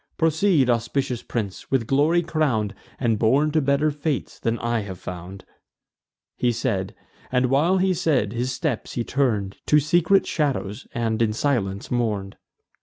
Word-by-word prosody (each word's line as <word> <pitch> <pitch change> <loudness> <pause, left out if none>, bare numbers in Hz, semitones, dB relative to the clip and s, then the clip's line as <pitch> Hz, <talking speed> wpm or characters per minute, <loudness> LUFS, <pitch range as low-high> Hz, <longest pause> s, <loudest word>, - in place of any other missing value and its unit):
Proceed, 160 -2 +3
auspicious 120 +1 0
prince, 105 -5 -5
with 130 -4 +1
glory 150 +8 +3
crown'd, 140 -11 0 0.3
And 115 -4 +1
born 135 +7 +3
to 155 0 +2
better 140 +2 +2
fates 145 -1 -3
than 115 0 -1
I 120 0 -1
have 100 -3 -6
found." 90 +2 -8 0.9
He 120 - +1
said; 110 -5 -2 0.4
and, 125 0 +2
while 165 +8 +3
he 190 0 +2
said, 130 - +1
his 125 +2 -1
steps 140 -3 -3
he 120 - -1
turn'd 110 -8 0
To 150 - +5
secret 175 +5 +3
shadows, 135 -7 -2
and 115 -1 0
in 110 -2 +2
silence 110 -6 -1
mourn'd. 105 -5 -1
125 Hz, 150 wpm, -23 LUFS, 110-150 Hz, 0.9 s, To